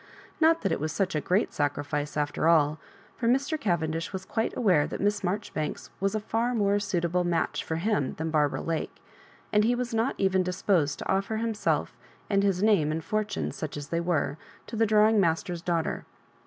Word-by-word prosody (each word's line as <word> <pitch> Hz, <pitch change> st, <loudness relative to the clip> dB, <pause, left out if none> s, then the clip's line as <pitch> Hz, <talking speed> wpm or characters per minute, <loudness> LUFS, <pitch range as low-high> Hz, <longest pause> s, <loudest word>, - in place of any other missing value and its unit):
Not 325 Hz, +1 st, +4 dB
that 195 Hz, -, +1 dB
it -, -, 0 dB
was 155 Hz, +2 st, -2 dB
such 190 Hz, +3 st, -1 dB
a 150 Hz, -, 0 dB
great 185 Hz, +8 st, +1 dB
sacrifice, 145 Hz, +1 st, -2 dB
after 150 Hz, +2 st, 0 dB
all. 155 Hz, -2 st, +4 dB, 0.4 s
For 230 Hz, -, -1 dB
Mr. 275 Hz, +5 st, +2 dB
Cavendish 165 Hz, -4 st, -1 dB
was 190 Hz, -1 st, -5 dB
quite 225 Hz, +3 st, -2 dB
aware 180 Hz, -11 st, +3 dB
that -, -, -5 dB
Miss 205 Hz, 0 st, +1 dB
Marjori 200 Hz, +3 st, -2 dB
banks 155 Hz, -1 st, -4 dB
was 195 Hz, +2 st, 0 dB
a -, -, +1 dB
far 230 Hz, +3 st, -1 dB
more 205 Hz, -2 st, +2 dB
suitable 180 Hz, -3 st, 0 dB
match 175 Hz, -1 st, 0 dB
for 160 Hz, -, -3 dB
him 165 Hz, -5 st, 0 dB
than 160 Hz, 0 st, -3 dB
Barbara 150 Hz, -2 st, +1 dB
Lake, 165 Hz, -1 st, -3 dB, 0.6 s
and 210 Hz, 0 st, +5 dB
he 240 Hz, +3 st, +3 dB
was 245 Hz, -1 st, -3 dB
not' 225 Hz, +4 st, +1 dB
even 190 Hz, -1 st, +2 dB
dis 180 Hz, +1 st, -4 dB
posed 155 Hz, -8 st, +2 dB
to -, -, -6 dB
offer 195 Hz, +3 st, 0 dB
himself 225 Hz, -2 st, -1 dB, 0.4 s
and 200 Hz, -1 st, +4 dB
his 195 Hz, -1 st, +1 dB
name 195 Hz, -9 st, +4 dB
and 160 Hz, +1 st, -3 dB
fortune, 215 Hz, -1 st, -2 dB
such -, -, -5 dB
as 145 Hz, -1 st, -7 dB
they 170 Hz, 0 st, 0 dB
were, 160 Hz, -3 st, -1 dB, 0.3 s
to -, -, -7 dB
the 225 Hz, 0 st, +3 dB
drawing 215 Hz, +1 st, +5 dB
master's 170 Hz, -1 st, 0 dB
daughter. 170 Hz, -2 st, -1 dB
185 Hz, 200 wpm, -27 LUFS, 160-215 Hz, 0.6 s, and